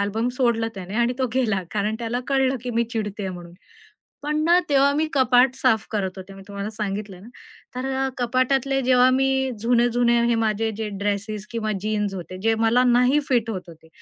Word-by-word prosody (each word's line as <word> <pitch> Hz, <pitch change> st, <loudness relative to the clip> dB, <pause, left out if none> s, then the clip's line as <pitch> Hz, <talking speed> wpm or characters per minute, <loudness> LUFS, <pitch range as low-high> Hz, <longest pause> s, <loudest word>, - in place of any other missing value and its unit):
Album 215 Hz, +4 st, -1 dB
सोडलं 230 Hz, -3 st, +1 dB
त्याने 190 Hz, +1 st, -7 dB
आणि 240 Hz, +1 st, +2 dB
तो 260 Hz, -, +1 dB
गेला 220 Hz, -7 st, +1 dB
कारण 210 Hz, +1 st, -1 dB
त्याला 235 Hz, +1 st, -2 dB
कळलं, 270 Hz, -1 st, +2 dB
की 250 Hz, -, -4 dB
मी 235 Hz, 0 st, +1 dB
चिडतेय 210 Hz, -3 st, -3 dB
म्हणून. 175 Hz, -1 st, -10 dB, 0.7 s
पण 300 Hz, +1 st, -1 dB
ना 345 Hz, +2 st, +5 dB
तेव्हा 280 Hz, 0 st, +4 dB
मी 310 Hz, +2 st, +1 dB
कपाट 255 Hz, -1 st, +4 dB
साफ 250 Hz, -5 st, +1 dB
करत 195 Hz, -3 st, -2 dB
होते 190 Hz, +1 st, -9 dB
मी 195 Hz, -, -12 dB
तुम्हाला 200 Hz, 0 st, -5 dB
सांगितलंय 205 Hz, -3 st, -5 dB
ना. 200 Hz, -, -14 dB, 0.5 s
तर 255 Hz, +1 st, -3 dB
अ, 265 Hz, 0 st, 0 dB
कपाटातले 260 Hz, +2 st, +1 dB
जेव्हा 255 Hz, 0 st, +4 dB
मी 265 Hz, 0 st, +1 dB
जुने-जुने 240 Hz, +1 st, +2 dB
हे 235 Hz, -, +2 dB
माझे 225 Hz, 0 st, 0 dB
जे 220 Hz, -1 st, -3 dB, 0.2 s
ड्रेसेस 205 Hz, 0 st, -2 dB
किंवा 220 Hz, -2 st, -2 dB
जीन्स 210 Hz, -2 st, -1 dB
होते 185 Hz, 0 st, -7 dB
जे 225 Hz, 0 st, +3 dB
मला 230 Hz, +2 st, +3 dB
नाही 250 Hz, +3 st, +4 dB
फिट 240 Hz, -4 st, +1 dB
होत 190 Hz, -4 st, -3 dB
होते, 160 Hz, -1 st, -15 dB
230 Hz, 190 wpm, -23 LUFS, 205-255 Hz, 0.7 s, ना